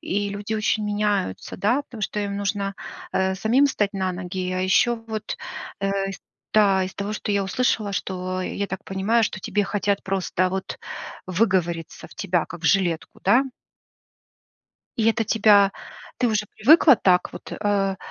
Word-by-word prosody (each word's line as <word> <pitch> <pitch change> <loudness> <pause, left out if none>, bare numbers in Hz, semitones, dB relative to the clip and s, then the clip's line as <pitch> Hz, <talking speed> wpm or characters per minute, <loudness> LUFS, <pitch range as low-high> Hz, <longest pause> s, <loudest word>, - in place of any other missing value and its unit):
и 205 +1 -1
люди 205 +2 -4
очень 215 0 0
меняются, 205 - -1
да, 245 +8 +2
потому 235 -5 -11
что 210 +2 -2
им 200 -1 -3
нужна, 200 0 -2 0.4
э, 190 0 +1
самим 230 +8 +3
стать 205 -7 0
на 190 -1 -1
ноги. 185 0 -4
А 185 - -1
еще 190 +6 +3
вот, 220 -1 -5 0.4
э, 195 0 0
из 195 - -9 0.3
да, 195 -3 +5
из 185 - -7
того, 200 +1 -3
что 215 - -4
я 200 -1 +1
услышала, 210 0 0
что 185 -1 -3
я 200 +2 -3
так 190 +1 -6
понимаю, 195 +5 +1
что 190 - -3
тебе 205 +3 0
хотят 200 0 -1
просто 185 -1 0
вот 190 0 -4 0.5
выговориться 180 -4 -1
в - - -16
тебя, 180 -4 0
как 170 - -10
в - - -11
жилетку. 175 -3 +1
Да? 240 +8 +4 1.5
И 225 -1 +2
это 225 0 +1
тебя 205 -2 +5 0.5
ты 245 - +2
уже 215 -1 0
привыкла 290 +5 +7
так 180 -1 +2
вот, - - -10
э, 200 -2 0
200 Hz, 165 wpm, -23 LUFS, 190-215 Hz, 1.5 s, привыкла